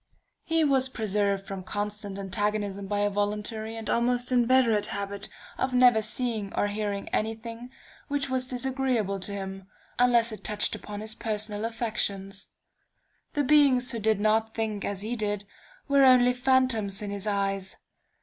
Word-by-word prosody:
"He 325 Hz, -1 st, +1 dB
was 265 Hz, -3 st, +2 dB
preserved 200 Hz, -4 st, -1 dB
from 195 Hz, -1 st, -6 dB
constant 205 Hz, +1 st, -4 dB
antagonism 200 Hz, 0 st, -2 dB
by 205 Hz, 0 st, -1 dB
a 205 Hz, -, +2 dB
voluntary 210 Hz, +2 st, -2 dB
and 225 Hz, -2 st, -7 dB
almost 245 Hz, +2 st, +1 dB
inveterate 240 Hz, -4 st, +3 dB
habit 200 Hz, 0 st, -4 dB, 0.3 s
of 260 Hz, -1 st, 0 dB
never 245 Hz, -3 st, +6 dB
seeing 220 Hz, -3 st, -2 dB
or 205 Hz, -, +1 dB
hearing 205 Hz, -1 st, -3 dB
any 220 Hz, +1 st, 0 dB
thing 230 Hz, +2 st, -9 dB, 0.4 s
which 285 Hz, -1 st, -1 dB
was 260 Hz, -1 st, -1 dB
disagreeable 255 Hz, -6 st, 0 dB
to 190 Hz, -, -1 dB
him, 195 Hz, -1 st, -6 dB, 0.3 s
unless 240 Hz, -2 st, +4 dB
it 215 Hz, -, -8 dB
touched 210 Hz, -1 st, +2 dB
upon 205 Hz, 0 st, -6 dB
his 215 Hz, 0 st, -5 dB
personal 215 Hz, -1 st, -2 dB
affections. 205 Hz, -4 st, -2 dB, 0.9 s
The 290 Hz, -, +1 dB
beings 270 Hz, -3 st, +4 dB
who 230 Hz, -, -3 dB
did 215 Hz, -1 st, +2 dB
not 220 Hz, +1 st, +1 dB
think 215 Hz, -3 st, -2 dB
as 200 Hz, -1 st, -3 dB
he 230 Hz, +3 st, -2 dB
did, 205 Hz, -2 st, -2 dB, 0.4 s
were 280 Hz, -1 st, +5 dB
only 250 Hz, -1 st, +6 dB
phantoms 245 Hz, -6 st, +1 dB
in 205 Hz, -, -4 dB
his 200 Hz, +1 st, -5 dB
eyes. 195 Hz, -1 st, -1 dB
215 Hz, 155 wpm, -27 LUFS, 205-245 Hz, 0.9 s, never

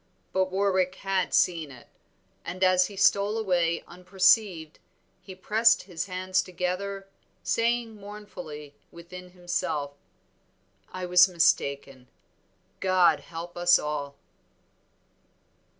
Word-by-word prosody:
But 190 Hz, 0 st, +2 dB
Warwick 190 Hz, -1 st, 0 dB
had 195 Hz, -1 st, -2 dB
seen 165 Hz, -4 st, +1 dB
it, 125 Hz, -3 st, -14 dB, 0.6 s
and 185 Hz, +2 st, -4 dB
as 185 Hz, 0 st, +4 dB
he 205 Hz, -, -11 dB
stole 200 Hz, +2 st, +2 dB
away 175 Hz, -6 st, 0 dB
unperceived 180 Hz, -2 st, +1 dB, 0.4 s
he 190 Hz, -, -11 dB
pressed 220 Hz, +5 st, +3 dB
his 180 Hz, -1 st, -5 dB
hands 185 Hz, 0 st, -1 dB
together, 190 Hz, +2 st, -4 dB, 0.4 s
saying 230 Hz, -1 st, 0 dB
mournfully 180 Hz, -8 st, -10 dB, 0.2 s
within 180 Hz, +2 st, -11 dB
himself, 175 Hz, -5 st, -3 dB, 1.0 s
"I 185 Hz, -1 st, -5 dB
was 180 Hz, +1 st, +6 dB
mistaken. 140 Hz, -6 st, 0 dB, 0.7 s
God 185 Hz, -2 st, +3 dB
help 170 Hz, +1 st, -9 dB
us 175 Hz, 0 st, +5 dB
all." 145 Hz, -2 st, -4 dB
185 Hz, 105 wpm, -26 LUFS, 170-195 Hz, 1.0 s, was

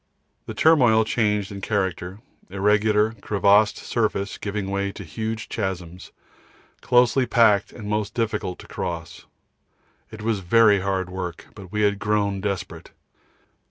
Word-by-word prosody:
The -, -, -6 dB
turmoil 125 Hz, -9 st, +4 dB
changed 105 Hz, -3 st, 0 dB
in 100 Hz, -1 st, -7 dB
character, 95 Hz, -1 st, -2 dB, 0.3 s
irregular 105 Hz, +2 st, +2 dB
crevassed 105 Hz, +1 st, +3 dB
surface 110 Hz, -3 st, -2 dB
giving 100 Hz, -1 st, -4 dB
way 100 Hz, 0 st, -1 dB
to 100 Hz, -, -9 dB
huge 110 Hz, +6 st, -5 dB
chasms, 90 Hz, -4 st, -5 dB, 0.7 s
closely 125 Hz, +1 st, +3 dB
packed 110 Hz, -4 st, +3 dB
and 105 Hz, -3 st, -9 dB
most 105 Hz, -1 st, -2 dB
difficult 105 Hz, -5 st, -2 dB
to -, -, -14 dB
cross. 85 Hz, -3 st, -6 dB, 0.8 s
It 110 Hz, -1 st, -10 dB
was 110 Hz, -2 st, 0 dB
very 105 Hz, +2 st, +4 dB
heavy 95 Hz, -1 st, -2 dB
work, 90 Hz, -2 st, -6 dB
but 95 Hz, -3 st, -12 dB
we 105 Hz, -, -1 dB
had 100 Hz, -1 st, +1 dB
grown 100 Hz, -2 st, 0 dB
desperate. 100 Hz, -3 st, -4 dB
105 Hz, 130 wpm, -23 LUFS, 95-110 Hz, 0.8 s, turmoil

